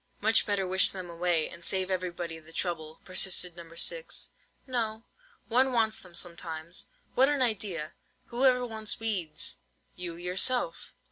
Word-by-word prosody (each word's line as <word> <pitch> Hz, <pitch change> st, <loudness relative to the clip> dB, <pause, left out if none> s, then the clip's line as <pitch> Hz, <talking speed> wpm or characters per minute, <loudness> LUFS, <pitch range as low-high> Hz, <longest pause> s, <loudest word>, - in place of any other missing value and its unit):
"Much 220 Hz, +2 st, +3 dB
better 200 Hz, -2 st, +1 dB
wish 185 Hz, +1 st, +4 dB
them 185 Hz, -2 st, -6 dB
away, 170 Hz, -2 st, +1 dB
and 170 Hz, -, -9 dB
save 190 Hz, +2 st, +2 dB
everybody 175 Hz, -3 st, -2 dB
the 160 Hz, 0 st, -16 dB
trouble," 160 Hz, -3 st, -3 dB
persisted 185 Hz, -1 st, +2 dB
No. 170 Hz, -1 st, -10 dB
6. -, -, 0 dB, 0.3 s
"No: 230 Hz, -4 st, -1 dB, 0.4 s
one 255 Hz, +3 st, +4 dB
wants 220 Hz, -2 st, +3 dB
them 180 Hz, -2 st, -15 dB
sometimes." 170 Hz, -1 st, -4 dB, 0.3 s
"What 265 Hz, +2 st, +5 dB
an 285 Hz, -3 st, +2 dB
idea! 200 Hz, -9 st, -1 dB, 0.4 s
Who 240 Hz, +3 st, -1 dB
ever 250 Hz, -2 st, +5 dB
wants 220 Hz, -2 st, -2 dB
weeds?" 190 Hz, -9 st, +1 dB, 0.4 s
"You 175 Hz, -2 st, -4 dB
yourself." 190 Hz, -, 0 dB
185 Hz, 145 wpm, -30 LUFS, 170-225 Hz, 0.4 s, What